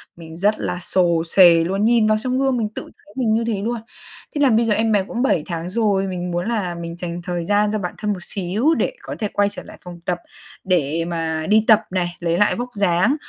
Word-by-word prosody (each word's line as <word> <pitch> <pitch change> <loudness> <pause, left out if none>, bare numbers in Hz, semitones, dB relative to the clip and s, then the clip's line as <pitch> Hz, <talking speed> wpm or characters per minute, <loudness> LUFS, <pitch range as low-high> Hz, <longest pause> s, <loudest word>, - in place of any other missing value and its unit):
mình 160 -1 -11
rất 205 +4 +1
là 180 - -3
xồ 175 -2 +1
xề 170 -1 +6
luôn, 195 +5 0
nhìn 230 -1 +4
vào 215 0 +3
trong 255 +2 -1
gương 270 -2 +1
mình 220 -3 -1
tự - - -4
thấy 205 - -19
mình 235 -4 +1
như 225 +1 +1
thế 210 -4 -1
luôn. 230 +2 -2 0.5
Thế 290 - 0
là 275 - +5
bây 230 +1 +3
giờ 220 - +2
em 220 +1 +1
bé 205 -2 +3
cũng 240 +2 -3
7 185 - +2
tháng 170 0 -4
rồi, 200 -2 +1
mình 180 -1 -4
muốn 175 +3 -2
là 195 -7 -2
mình 170 0 -7
dành 175 -1 -5
thời 175 -1 -3
gian 205 0 +3
cho 215 - 0
bản 180 -3 -4
thân 210 -1 -1
một 180 - -8
xíu 205 - 0
để - - 0
có - - -7
thể 210 - -1
quay 205 0 +2
trở - - -9
lại - - -13
phòng 175 -1 -10
tập, 175 -1 -1 0.4
để 165 -3 0
mà 165 -2 -2
đi 215 +1 +5
tập 220 -1 +6
này, 175 -2 -2
lấy 170 0 0
lại 205 - +3
vóc 245 +1 -4
dáng, 200 +5 +2
195 Hz, 255 wpm, -21 LUFS, 175-220 Hz, 0.5 s, xề